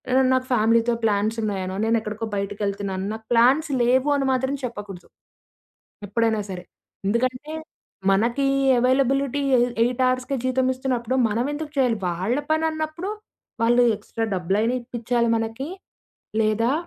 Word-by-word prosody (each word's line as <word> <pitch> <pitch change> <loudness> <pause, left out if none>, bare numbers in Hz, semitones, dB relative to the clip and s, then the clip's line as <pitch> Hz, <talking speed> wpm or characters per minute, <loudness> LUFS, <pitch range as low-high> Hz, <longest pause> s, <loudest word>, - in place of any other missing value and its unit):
నను 260 0 +4
నాకు 260 0 +1
ఫ్యామిలీతో 230 0 +3
ప్లాన్స్ 215 0 +1
ఉన్నాయినో 190 -3 -2
నేను 225 +1 +3
ఎక్కడికో 215 +1 -5
బయటికెళ్తున్నాను 200 -1 -3
నాకు 220 0 -9
ప్లాన్స్ 260 +7 +4
లేవు 255 +4 +3
అని 275 -1 0
మాత్రం 265 +2 0
చెప్పకూడదు 205 -7 -7 1.0
ఎప్పుడైనా 225 +1 +1
సరే. 180 -1 -6 0.4
ఎందుకంటే 255 +7 -1 0.6
మనకి 235 +7 +2 0.3
అవైలబిలిటీ 270 +2 +2 0.2
ఎ - - +4 0.2
ఎయిట్ 245 +2 0
అవర్స్‌కే 255 +2 -1
జీతం 255 0 +1
ఇస్తున్నప్పుడు 255 -2 -2
మనం 230 +4 0
ఎందుకు 300 0 -5
చేయాలి? 250 -4 +2
వాళ్ళ 185 +9 -1
పని 315 +1 +2
అన్నప్పుడు 315 +4 -4 0.5
వాళ్ళు 240 +2 +4
ఎక్స్‌స్ట్రా 225 +2 -4
డబ్బులు 185 +2 0
అయినా 235 +3 +1
ఇప్పించాలి 235 0 -1
మనకి. 225 +6 -4 0.7
లేదా 220 +3 +2
235 Hz, 130 wpm, -23 LUFS, 215-260 Hz, 1.0 s, నను